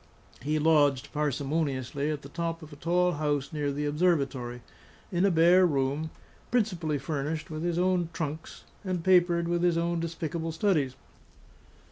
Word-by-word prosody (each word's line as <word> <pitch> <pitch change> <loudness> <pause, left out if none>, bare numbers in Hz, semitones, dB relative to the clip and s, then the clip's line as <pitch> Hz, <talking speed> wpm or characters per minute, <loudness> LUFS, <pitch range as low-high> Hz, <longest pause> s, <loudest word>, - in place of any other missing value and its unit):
He 150 +3 0
lodged 145 -4 +3
parsimoniously 145 -1 -1
at 150 -1 -3
the 140 - -10
top 165 +1 -3
of 155 -1 -11
a - - -9
tall 175 +4 +1
house 145 -2 -1
near 145 -2 -1
the 145 +1 -2
Observatory, 140 -6 0 0.5
in 180 +1 +2
a - - +5
bare 175 +2 +5
room, 145 -1 0 0.4
principally 180 -10 0
furnished 155 +2 -3
with 155 0 -4
his 170 0 -1
own 180 -2 +1
trunks 160 -2 -5 0.2
and 185 -3 -2
papered 175 -2 +4
with 175 0 0
his 175 -1 +2
own 170 0 0
despicable 165 0 -3
studies. 155 -8 +1
160 Hz, 150 wpm, -28 LUFS, 145-175 Hz, 0.5 s, a